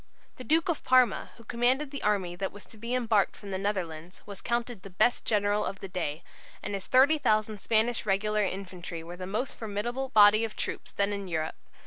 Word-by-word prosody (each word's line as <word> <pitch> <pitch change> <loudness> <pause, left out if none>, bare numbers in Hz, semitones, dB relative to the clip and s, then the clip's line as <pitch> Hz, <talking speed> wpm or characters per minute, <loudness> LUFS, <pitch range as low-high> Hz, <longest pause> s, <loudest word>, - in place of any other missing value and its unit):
The 255 - -8
Duke 320 +4 +2
of 340 -4 -1
Parma, 255 -1 +3
who 230 - -14
commanded 245 +5 +1
the 280 - -5
army 190 -4 0
that 195 +2 -3
was 205 - -12
to 225 - -15
be 235 +3 -2
embarked 225 -5 +2
from 200 - -9
the 190 - -2
Netherlands, 180 -4 -4
was 200 -2 -9
counted 235 -3 -2
the 195 - -10
best 215 +6 +2
general 205 -1 +2
of 195 - -4
the 195 - -6
day, 170 -4 -3 0.4
and 205 - -4
his 195 -1 -4
30,000 245 -7 +3
Spanish 225 +1 +1
regular 210 +1 +1
infantry 185 -3 -5
were 170 +2 -8
the 185 0 -7
most 220 +7 -2
formidable 240 +5 -3
body 215 -1 +6
of 225 -1 -3
troops - - -4
then 200 0 0
in 200 -1 -4
Europe. 160 -2 -2
210 Hz, 200 wpm, -29 LUFS, 190-240 Hz, 0.4 s, body